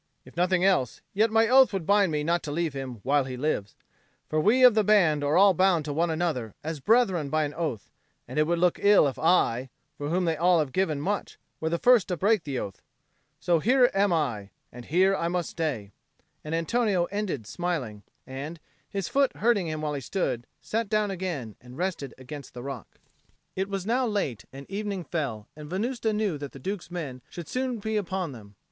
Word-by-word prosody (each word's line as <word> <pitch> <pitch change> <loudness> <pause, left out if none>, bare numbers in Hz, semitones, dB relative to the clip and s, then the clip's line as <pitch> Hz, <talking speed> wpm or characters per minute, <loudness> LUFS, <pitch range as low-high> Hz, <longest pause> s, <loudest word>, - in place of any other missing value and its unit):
"If - - -16
nothing 180 +1 +2
else, 180 - +1
yet 215 +3 +3
my 225 +1 +3
oath 260 +2 +6
would 190 -5 -3
bind 200 -2 +3
me 150 -1 -1
not 170 +2 +1
to 145 - -4
leave 165 -1 -1
him 130 -5 -6
while 140 +1 +2
he 130 -1 -6
lives. 125 -8 -2 0.5
For 155 - 0
we 235 +9 +4
of 250 -2 +9
the 215 0 +3
band 175 -8 +4
are 145 +3 +2
all 195 0 +7
bound 180 -3 +2
to 145 - -3
one 165 +3 +1
another 155 -9 -2
as 160 0 -4
brethren 190 - +2
by 155 +2 +1
an 145 -1 -3
oath, 150 - -4 0.4
and - - -3
it 155 - +3
would 170 +1 +1
look 175 0 +2
ill 200 -6 +6
if 135 - -4
I, 135 -7 +2 0.3
for 145 0 -3
whom 180 +2 +1
they 165 -1 +1
all 175 +3 +3
have 150 -4 0
given 170 -5 0
much, 200 +7 -3 0.2
were 160 - -1
the 170 - 0
first 245 +1 +4
to 180 -3 -2
break 205 -1 +2
the 140 -3 -3
oath. 100 -5 -5 0.6
So 170 -2 +2
here 250 - +4
I 195 - 0
am, 150 - +1 0.2
and 120 0 -10
here 190 +5 +3
I 170 - -1
must 175 0 -2
stay," 130 -12 -3 0.5
and 155 +1 -3
Antonio 190 +1 +1
ended 200 - -3
smiling, 140 - -3 0.2
and, 145 +5 -7 0.3
his 195 -3 -3
foot 275 -1 +1
hurting 215 -6 +2
him 155 -1 -3
while 150 -1 -2
he 140 - -3
stood, 120 - -2
sat 225 -1 -2
down 215 -2 +1
again 170 - -4
and 125 +2 -13
rested 175 -6 -3
against 130 +1 -10
the 120 - -7
rock. 135 -5 -6 0.7
It 190 +1 -2
was 195 -2 -3
now 245 +3 +1
late, 195 - -2
and 135 +1 -10
evening 200 -2 -4
fell; 135 -12 -4
and 150 -1 -10
Venusta 225 +5 -1
knew 210 -7 -1
that 145 -1 -7
the - - -9
Duke's 190 +4 -5
men 150 -8 -6
should 170 -2 -8
soon 255 -1 -2
be 220 +1 -2
upon 185 -4 -2
them. 105 -5 -13
170 Hz, 210 wpm, -27 LUFS, 145-200 Hz, 0.7 s, of